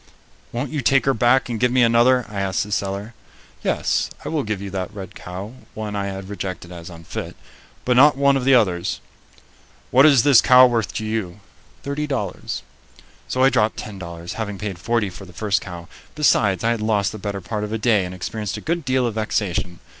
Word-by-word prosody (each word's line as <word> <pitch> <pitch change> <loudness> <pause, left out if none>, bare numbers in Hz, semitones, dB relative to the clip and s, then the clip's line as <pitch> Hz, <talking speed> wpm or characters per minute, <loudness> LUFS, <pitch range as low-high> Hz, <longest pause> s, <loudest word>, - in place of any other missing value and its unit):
"Won't 125 +3 -3
you 150 -2 -2
take 135 +2 +3
her 135 - +3
back 120 +4 +3
and 115 -3 -3
give 125 +1 +2
me 125 -1 +4
another?" 120 +2 +4
I 105 -2 -5
asked 95 -1 0
the 105 - -9
seller. 100 +3 -2 0.5
"Yes, - - 0 0.2
I - - -3
will 155 -2 0
give 105 -5 -3
you 100 0 -6
that 95 0 -4
red 100 -3 -8
cow," 95 +5 -8 0.2
one 105 -1 -4
I 100 -1 -2
had 95 -1 -6
rejected 95 -3 -6
as 85 -1 -9
unfit, 85 -1 -7 0.5
"but 125 - +2
not 140 +2 +6
one 140 0 +4
of 135 - 0
the 135 +1 +5
others." 90 -7 +1 0.9
"What 135 +4 +7
is 140 -6 +5
this 140 -4 +7
cow 130 0 +8
worth 115 -4 0
to 110 - -3
you?" 110 -4 -3 0.4
"Thirty 145 +2 -3
dollars." 115 -10 -3 0.6
So 130 - 0
I 135 - +6
dropped 110 -3 +1
ten 100 -3 -7
dollars, 85 -1 -7
having 105 -3 -4
paid 100 -3 -5
forty 110 0 0
for 90 +3 -10
the 90 - -14
first 105 +3 0
cow. 85 -3 -8 0.3
Besides, 105 - +2
I 115 - +2
had 115 -2 -1
lost 105 -2 +1
the 110 - -8
better 100 0 -4
part 105 +4 -4
of 105 - -4
a 110 - -1
day 110 -3 +2
and 90 0 -6
experienced 105 +3 -4
a - - -5
good 170 +1 -2
deal 130 -1 +1
of 115 - -1
vexation. 100 -5 -2
105 Hz, 215 wpm, -21 LUFS, 95-125 Hz, 0.9 s, cow